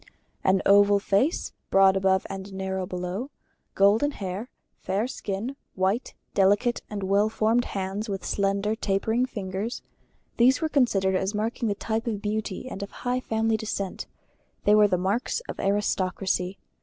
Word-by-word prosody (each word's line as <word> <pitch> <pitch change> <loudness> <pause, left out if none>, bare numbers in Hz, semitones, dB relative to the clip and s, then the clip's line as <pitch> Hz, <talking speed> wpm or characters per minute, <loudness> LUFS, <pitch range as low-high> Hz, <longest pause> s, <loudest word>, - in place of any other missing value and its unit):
An 190 0 +3
oval 205 0 +6
face, 200 - +1 0.2
broad 195 0 +5
above 190 0 +2
and 195 +1 -7
narrow 190 -1 -3
below, 180 +8 -4 0.5
golden 205 +8 +4
hair, 200 -1 -5 0.3
fair 200 +4 -1
skin, 225 +2 -4 0.2
white, 195 +6 0 0.2
delicate, 205 +5 +3
and 205 -2 -4
well 200 +3 +3
formed 225 +2 +2
hands 195 +3 -3
with 195 -2 -4
slender 200 +1 0
tapering 220 +4 0
fingers: 200 0 -4 0.5
these 250 +2 +5
were 315 - -1
considered 205 -10 +2
as 190 +3 -1
marking 225 +2 -1
the 205 - 0
type 225 +3 -2
of 215 -3 -1
beauty 210 +1 -3
and 200 - -6
of 200 - -5
high 250 0 -2
family 225 -2 0
descent; 200 -3 -4 0.6
they 205 - +5
were 210 0 +6
the 185 -2 +1
Marks 200 - 0
of - - -8
Aristocracy. 190 -2 0
205 Hz, 150 wpm, -26 LUFS, 190-225 Hz, 0.6 s, oval